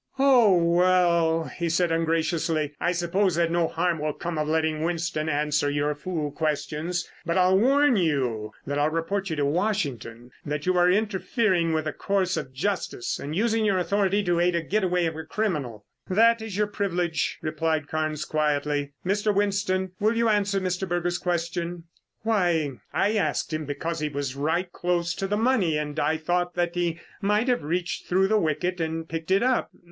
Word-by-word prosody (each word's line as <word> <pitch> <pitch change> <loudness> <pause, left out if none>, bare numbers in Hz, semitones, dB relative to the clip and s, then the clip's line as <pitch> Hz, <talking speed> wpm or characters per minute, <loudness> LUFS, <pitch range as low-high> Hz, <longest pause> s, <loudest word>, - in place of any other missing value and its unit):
"Oh 250 -8 +5
well," 170 -1 +3
he 170 +1 -4
said 170 +1 +1
ungraciously. 165 -2 0
"I 175 - +2
suppose 180 +2 +1
that 170 0 +1
no 170 -1 +2
harm 170 0 -1
will 150 0 -1
come 170 0 -4
of 150 - -1
letting 155 0 0
Winston 165 -2 -1
answer 150 -1 +1
your 145 +1 0
fool 150 -1 -4
questions, 155 +4 -2 0.2
but 170 +1 -1
I'll 185 0 +4
warn 275 +6 +4
you 125 - 0
that 145 +1 -2
I'll 150 +1 +3
report 175 +5 -2
to 155 -5 -1
Washington 140 - -2
that 145 0 -4
you 185 0 +2
are 180 0 +4
interfering 195 -3 +1
with 155 -1 0
the 155 - -2
course 190 -2 0
of 135 -3 -4
justice 150 -2 -2
and 150 +2 -5
using 225 +2 +1
your 200 -3 +2
authority 200 +2 +1
to 175 -2 +1
aid 175 0 +2
the 170 - +1
getaway 180 -2 +1
of 165 -1 -2
a 160 - -5
criminal." 150 - -3 0.2
"That 230 +4 +4
is 220 -3 -5
your 210 - +3
privilege," 180 -6 -1
replied 155 -1 -1
Carnes 155 -1 -2
quietly. 145 -1 -1
"Mr. 205 +3 +1
Winston, 195 -2 0
will 220 +2 +2
you 230 -1 +3
answer 205 -2 +1
Mr. 185 0 -2
Berger's 175 0 -1
question?" 170 -1 -2 0.4
"Why, 175 -9 +1 0.2
I 205 +2 +1
asked 165 -6 -1
him 155 0 -2
because 165 +4 -3
he 150 0 -1
was 140 -2 -4
right 165 +6 -1
close 175 -1 -1
to 195 - -3
the 205 +1 0
money 215 -9 +2
and 150 -1 -3
I 160 - +1
thought 175 +2 -1
that 175 -1 0
he 175 -1 -1 0.2
might 210 +4 +1
have 245 -1 +2
reached 175 +4 -2
through 190 +2 +2
the 215 0 +3
wicket 170 +2 -1
and 160 0 -3
picked 165 +1 -5
it 195 +4 +3
up. 255 0 +1
170 Hz, 180 wpm, -25 LUFS, 155-190 Hz, 0.4 s, Oh